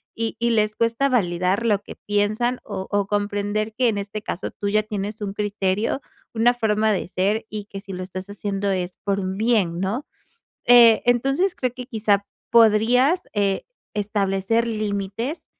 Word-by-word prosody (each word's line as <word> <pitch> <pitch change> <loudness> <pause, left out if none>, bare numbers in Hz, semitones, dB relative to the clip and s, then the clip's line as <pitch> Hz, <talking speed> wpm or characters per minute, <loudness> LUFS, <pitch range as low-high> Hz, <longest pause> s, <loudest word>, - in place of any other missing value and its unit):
y 225 0 -2
y 235 0 +1
les 215 -1 +1
cuesta 230 +4 +1
validar 185 -2 +1
lo 210 -3 +3
que - - -11
piensan 215 +4 0
o 190 -2 -5
o 205 -1 +1
comprender 205 +1 -1
que, 245 +2 +2
en 220 -3 +1
este 205 +1 -5
caso, 195 -3 -4
tú 205 - -3
ya 215 +1 +2
tienes 210 0 -5
un 200 -1 -3
criterio, 205 +3 -1 0.3
una 235 +2 +4
forma 220 -2 +1
de 195 - -1
ser 200 +5 0
y 210 -1 -5
que 200 -1 -8
si 195 0 -9
lo 185 0 -4
estás 185 +1 -7
haciendo 200 -1 -2
es 180 -2 -2
por 200 -1 0
un 190 0 -3
bien, 210 -7 +1
¿no? 210 - -2 0.6
Eh, 235 -2 +7
entonces 275 +10 +2
creo 255 -2 -2
que 250 - -7
quizá 210 -4 +1 0.3
podrías, 235 - +5
eh, 200 -2 0 0.3
establecer 205 +2 0
límites, 215 - -3
210 Hz, 170 wpm, -23 LUFS, 200-230 Hz, 0.6 s, Eh